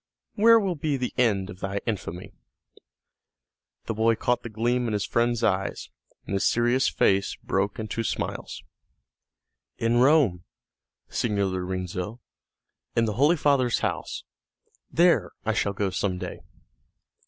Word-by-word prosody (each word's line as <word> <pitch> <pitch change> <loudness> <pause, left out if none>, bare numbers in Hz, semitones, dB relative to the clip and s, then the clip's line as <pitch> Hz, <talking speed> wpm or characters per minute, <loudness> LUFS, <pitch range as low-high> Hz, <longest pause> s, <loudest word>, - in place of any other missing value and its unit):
Where 230 +2 +6
will 195 -4 0
be 150 -3 -1
the 125 -1 -3
end 105 -6 +1
of 90 - -12
thy 100 +1 -2
infamy?" 95 -5 -4 1.5
The 115 - -2
boy 110 +1 +2
caught 125 +1 0
the 115 - -7
gleam 120 +3 0
in 110 - -2
his 105 - 0
friend's 120 0 0
eyes, 95 -2 -1 0.3
and - - -5
his 95 - +1
serious 120 +3 +2
face 95 0 +2
broke 100 +1 -1
into 110 +1 -3
smiles. - - -4 1.1
"In 115 +1 +1
Rome, 130 - +4 0.7
Signor 105 -4 0
Lorenzo, 90 +3 -4 0.8
in 115 - +3
the 105 - -1
Holy 145 - +3
Father's 135 -6 +2
house. - - -3 0.7
There 170 +1 +3
I 110 - +1
shall 100 -1 0
go 100 0 -1
some 95 -1 -1
day." - - -6
115 Hz, 135 wpm, -26 LUFS, 100-125 Hz, 1.5 s, Where